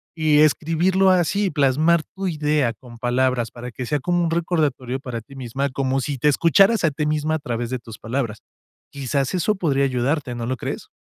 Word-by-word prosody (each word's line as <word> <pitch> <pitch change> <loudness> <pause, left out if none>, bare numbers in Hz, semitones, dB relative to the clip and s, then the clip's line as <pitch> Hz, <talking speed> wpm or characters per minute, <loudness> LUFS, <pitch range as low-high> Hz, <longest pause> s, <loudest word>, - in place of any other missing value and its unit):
y 155 -2 +3
escribirlo 165 +5 +3
así 185 +3 +2
y 190 - +1
plasmar 155 +3 +2
tu 195 0 -3
idea 150 -7 +1
con 120 0 -15
palabras 125 -1 +1
para 125 +1 -8
que 125 +1 -6
sea 150 -1 0
como 175 +4 0
un 165 - 0
recordatorio 150 -7 -1
para 125 -4 -6
ti 135 +5 -15
misma, 135 +2 -3
como 135 0 -1
si 140 0 -3
te 150 - +2
escucharas 170 - +4
a 165 - +3
ti 150 +2 -2
misma 155 +1 0
a - - -2
través 120 -3 -4
de 130 - -2
tus 115 -2 -11
palabras. 115 -2 -3 0.5
Quizás 135 -1 -2
eso 185 +4 +1
podría 140 -7 +1
ayudarte, 130 0 -1
¿no 120 - -4
lo 130 +2 -1
crees? - - -6
140 Hz, 200 wpm, -22 LUFS, 125-160 Hz, 0.5 s, escucharas